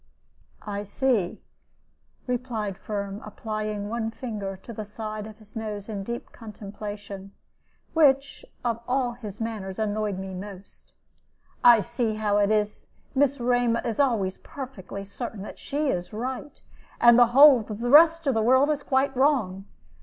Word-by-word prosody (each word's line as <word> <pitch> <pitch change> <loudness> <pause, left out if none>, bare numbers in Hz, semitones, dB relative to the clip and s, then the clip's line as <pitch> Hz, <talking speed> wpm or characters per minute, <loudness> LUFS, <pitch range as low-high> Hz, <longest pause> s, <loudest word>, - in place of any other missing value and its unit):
"I 205 -1 -3
see," 205 -2 0 0.8
replied 240 -5 -2
Firm, 200 0 -5
applying 215 -1 -4
one 225 0 -2
finger 210 -5 -5
to 235 - -8
the 215 - -5
side 215 0 -6
of 215 -1 -11
his 215 -2 -20
nose 210 -2 -5
in 210 -3 -4
deep 235 +4 -6
contemplation, 205 -2 -8 0.6
which, 280 - +3 0.2
of 230 -1 0
all 250 -1 +1
his 220 -4 -9
manners, 215 -4 -4
annoyed 210 -2 -1
me 190 0 -6
most. 195 +1 -10 0.7
"I 235 -3 +8
see 220 +1 -1
how 210 -1 +1
it 205 0 +3
is; 210 -1 0 0.3
Miss 280 0 +2
Rema 245 -1 +2
is 235 +2 -2
always 220 -9 +1
perfectly 200 -8 -8
certain 200 +1 -6
that - - -9
she 290 +1 -1
is 175 -6 -2
right, 255 +6 -5 0.4
and 240 0 +7
the 240 - +7
whole 285 -3 +10
of 210 0 -5
the 240 +1 -1
rest 330 +2 +7
of 275 - +2
the 225 - +1
world 260 +6 +4 0.2
quite 270 0 +2
wrong. 240 -9 +1
220 Hz, 150 wpm, -26 LUFS, 205-250 Hz, 0.8 s, whole